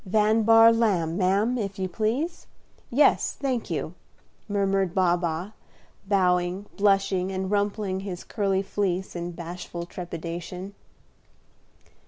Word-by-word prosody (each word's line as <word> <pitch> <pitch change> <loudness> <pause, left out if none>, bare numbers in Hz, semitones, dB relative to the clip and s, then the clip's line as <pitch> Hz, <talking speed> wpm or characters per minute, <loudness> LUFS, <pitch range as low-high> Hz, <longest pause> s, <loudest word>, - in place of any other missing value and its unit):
"Van 215 +2 +2
Bahr 225 +1 +7
Lamb, 190 -8 +1
ma'am, 200 +6 +1
if 200 -2 -4
you 190 -1 -1
please. 235 - -2 0.4
Yes, 280 +5 +3
thank 260 -4 -2
you," - - -3 0.5
murmured 195 -3 0
Baa 180 -2 +4
Baa, 175 +2 -3 0.6
bowing, 180 -1 +1
blushing, 195 -2 +2
and 190 0 -3
rumpling 205 -2 0
his 190 -2 -6
curly 195 -2 0
fleece 190 -2 -2
in 175 0 -3
bashful 170 0 -6
trepidation. 175 +2 -6
195 Hz, 115 wpm, -26 LUFS, 180-210 Hz, 0.6 s, Bahr